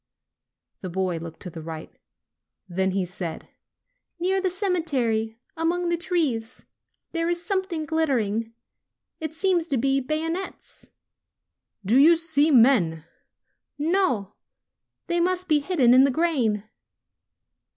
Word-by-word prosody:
The 185 - -5
boy 185 -1 -1
looked 165 0 -9
to 180 - -7
the 160 - -8
right. 160 0 -8 0.7
Then 190 +1 0
he 190 0 -1
said: 180 -2 -6 0.7
"Near 380 +2 +1
the 375 - +1
cemetery, 285 - -1 0.2
among 345 +2 0
the 345 - +2
trees, 300 -10 -2 0.5
there 330 0 -1
is 345 0 -1
something 375 -5 -2
glittering. 235 -9 0 0.7
It 315 -1 -4
seems 350 -1 +1
to 280 -5 0
be 270 +3 +2
bayonets." 325 +7 -4 1.0
"Do 225 +7 +3
you 325 +4 +7
see 320 -2 +2
men?" 225 - +4 0.7
"No. 295 - 0 0.7
They 345 -1 0
must 365 +1 0
be 305 -2 +4
hidden 285 -6 +3
in 260 +1 +7
the 275 - +4
grain." 250 -9 0
285 Hz, 120 wpm, -25 LUFS, 220-340 Hz, 1.0 s, you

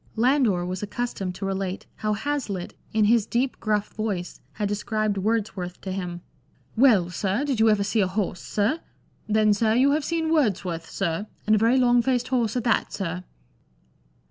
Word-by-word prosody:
Landor 235 -7 +2
was 185 +1 -4
accustomed 205 -4 -3
to 195 - -5
relate 195 -1 -3
how 215 -1 0
Hazlitt 220 -6 -3 0.2
in 215 -1 +3
his 225 0 +3
deep 250 +2 -1
gruff 210 -1 0
voice 205 -5 -4
had 210 -1 -2
described 210 +1 -1
Wordsworth 200 -4 -2
to 190 - -5
him. 180 -2 -4 0.3
" - - -38 0.2
Well, 220 -8 +4
sir, 200 +8 -1
did 270 -6 -1
you 220 0 +5
ever 210 -2 +3
see 210 +2 +1
a 190 - +2
horse, 185 -2 -2
sir? 220 +10 0 0.5
Then, 215 0 +4
sir, 220 +1 +2
you 265 +3 +4
have 300 +1 +1
seen 325 +1 0
Words 215 - +2
worth, 165 -2 -4
sir, 195 +2 -2
— - - -35
and 215 - +3
a - - +3
very 230 +4 +4
long 245 -1 +4
faced 250 0 0
horse 240 -4 +1
at 245 - -1
that, 235 -2 +1
sir 180 -2 -4
215 Hz, 190 wpm, -25 LUFS, 195-240 Hz, 0.5 s, you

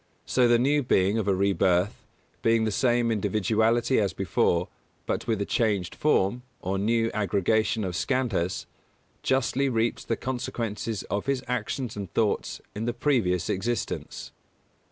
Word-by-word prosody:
So 125 -1 +3
the 120 0 +5
new 140 +5 +2
being 100 -3 +2
of 105 - -2
a 100 - +3
rebirth, 95 -1 +1 0.4
being 115 0 +3
the 110 - 0
same 120 +2 +2
individuality 110 +3 +2
as 100 -5 0
before, - - +1 0.4
but - - -2
with 110 -3 0
a - - 0
changed 100 -6 0
form, 120 -6 +1 0.2
or 95 +1 -2
new 115 +2 +1
aggregation 105 +2 +1
of 90 -2 -3
Skandhas, 100 -9 -1 0.6
justly 135 +1 +1
reaps 115 -1 0
the 115 - -2
consequences 115 -4 -3
of 100 +5 -3
his 135 -2 0
actions 125 0 -2
and 100 -4 -6
thoughts 110 -2 0
in 105 +2 -4
the 120 - -1
previous 115 - +1
existence. 115 +5 -3
110 Hz, 145 wpm, -26 LUFS, 100-120 Hz, 0.6 s, the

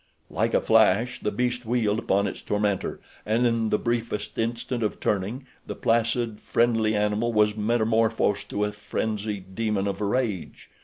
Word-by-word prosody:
Like - - 0
a - - +3
flash 110 +2 +3
the - - -1
beast 125 +3 -1
wheeled 110 -2 +1
upon 100 -2 +1
its - - -4
tormentor, 105 -2 -1 0.2
and, 115 +3 +1
in 115 -2 +1
the 105 - +2
briefest 115 -3 -2
instant 120 +2 -2
of 105 - -1
turning, 105 +7 -1 0.2
the - - -4
placid, 115 -1 0
friendly 115 -2 +1
animal 105 +3 +1
was 105 -1 +3
metamorphosed 110 -2 +1
to 105 - -1
a 105 - 0
frenzied 105 -2 -4
demon 105 -2 0
of 100 - -3
rage. 105 -3 -2
110 Hz, 155 wpm, -25 LUFS, 105-115 Hz, 0.2 s, a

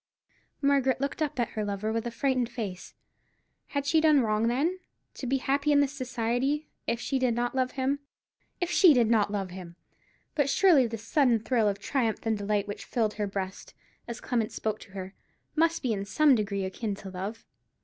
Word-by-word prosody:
Margaret 275 -2 +3
looked 280 +3 -3
up 300 -3 -1
at 235 - +1
her 215 - -3
lover 205 +2 -2
with 230 +1 -1
a - - -1
frightened 255 0 0
face. 205 -7 -6 0.7
Had 280 -1 -2
she 315 +2 +3
done 305 -3 +5
wrong, 215 0 +1
then, 300 +10 0 0.3
to 260 - -6
be 270 +2 +2
happy 280 +3 +1
in 290 - +5
his 285 -1 +2
society, 255 +2 -1 0.2
if 235 - 0
she 270 +2 -1
did 250 -3 +1
not 240 0 -1
love 255 -1 0
him—if 280 +6 -5
she 345 -7 +7
did 235 -2 +3
not 210 -3 +3
love 195 -3 -3
him! 180 -2 -9 0.6
But 290 -2 +1
surely 300 -6 +5
this 225 -1 -6
sudden 250 -1 +3
thrill 225 -1 +1
of 200 - -2
triumph 225 +1 -1
and 225 -1 +2
delight 205 0 -1
which 205 - -6
filled 220 -4 0
her 210 -1 -2
breast, 195 -1 -5 0.3
as 235 0 -5
Clement 230 -4 -1
spoke 215 -1 -3
to 195 - -14
her, 190 -1 -6 0.4
must 330 0 +2
be 245 -4 +1
in 195 -1 -2
some 290 +8 +4
degree 200 -4 0
akin 200 +2 -3
to 195 -1 -9
love. 195 +5 -6
235 Hz, 195 wpm, -28 LUFS, 210-275 Hz, 0.7 s, she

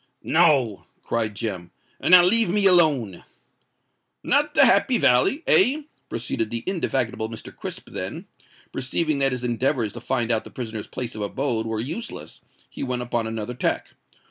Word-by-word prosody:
"No," 145 - +1 0.2
cried 110 -3 -2
Jem; 95 -6 -5 0.3
"and - - -1
now 180 -1 +9
leave 225 +1 +9
me 205 +2 +2
alone." 150 - +2 1.0
"Not - - +1
the - - +6
Happy - - +3
Valley—eh?" 305 - +2 0.3
proceeded 115 -1 -3
the 115 0 -4
indefatigable 130 - -2
Mr. 115 -1 -10
Crisp: - - -8
then, - - -6 0.5
perceiving 150 +3 -1
that 135 0 +3
his 125 -1 -3
endeavours 120 -2 -1
to 120 - -9
find 120 -2 -1
out 110 -1 +1
the - - -12
prisoner's 110 -4 -7
place 125 -2 -5
of 110 - -7
abode 115 +1 -2
were 110 -1 -3
useless, 160 - -7 0.3
he - - -11
went 125 -2 -3
upon 120 -2 -3
another 110 +1 -5
tack. 125 - -3
125 Hz, 155 wpm, -23 LUFS, 110-155 Hz, 1.0 s, now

